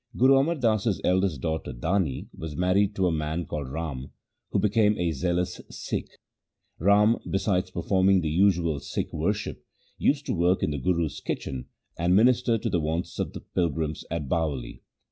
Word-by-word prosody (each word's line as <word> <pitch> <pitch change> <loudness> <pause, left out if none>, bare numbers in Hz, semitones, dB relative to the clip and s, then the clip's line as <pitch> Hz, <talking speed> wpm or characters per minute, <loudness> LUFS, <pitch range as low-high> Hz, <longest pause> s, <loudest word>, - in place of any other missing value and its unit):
1 - - -12
Guru 135 +2 +6
Amar 165 +5 +1
Das's 110 - +1
elder 95 +2 +3
daughter 80 +4 -3
Dani 80 +1 -1
was 80 -2 -6
married 95 +3 +2
to 95 - +1
a 90 - +2
man 80 +2 -2
called 75 -2 -4
Rama, 70 -4 -4 0.4
who - - 0
became 105 0 +3
a 85 -1 0
zealous 90 +4 -1
Sikh. - - -4 0.7
Rama, 105 +5 +4
besides 95 -1 0
performing 95 +2 +2
the 80 - -1
usual 85 -4 +2
Sikh 70 - -4
worship, 100 +6 -2 0.4
used 140 0 +2
to - - -1
work 90 0 +2
in - - +1
the 75 - -2
Guru's 85 +1 0
kitchen 65 -2 -4 0.3
and 90 +2 +3
minister 120 +1 +4
to - - -3
the 90 - +1
wants 80 +2 -3
of - - -1 0.2
pilgrims 80 -3 -1
at 80 -1 -2
the 65 - +1
Bawali. 75 -7 -3
90 Hz, 170 wpm, -26 LUFS, 80-100 Hz, 0.7 s, Guru